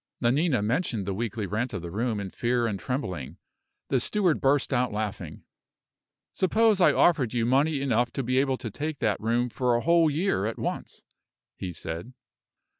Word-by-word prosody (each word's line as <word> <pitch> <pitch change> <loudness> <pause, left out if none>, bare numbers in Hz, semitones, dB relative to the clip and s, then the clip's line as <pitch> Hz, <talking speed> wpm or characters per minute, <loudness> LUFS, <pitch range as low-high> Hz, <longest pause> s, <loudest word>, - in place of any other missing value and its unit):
Nanina 130 0 +2
mentioned 115 - -1
the 100 - -2
weekly 110 +1 -3
rent 110 +6 -2
of 85 - -4
the 85 - -6
room 110 +2 -1
in 95 -2 -5
fear 120 0 0
and 105 -4 -2
trembling. 95 - -4 0.5
The 130 - +2
steward 180 - +1
burst 140 0 +2
out 125 -1 +1
laughing. 105 -6 -5 0.9
"Suppose 215 +1 +3
I - - +6
offered 145 -10 +3
you 115 -1 +1
money 140 +4 +2
enough 120 -3 +1
to 135 - -2
be 130 +2 +1
able 135 -1 +1
to 115 - -6
take 150 +6 -4
that 110 -5 0
room 120 +3 +1
for 125 0 0
a 120 - +1
whole 170 +1 +4
year 150 - 0
at 115 - -4
once?" - - -5 0.5
he 90 - -5
said. 85 +8 -6
120 Hz, 180 wpm, -27 LUFS, 110-140 Hz, 0.9 s, I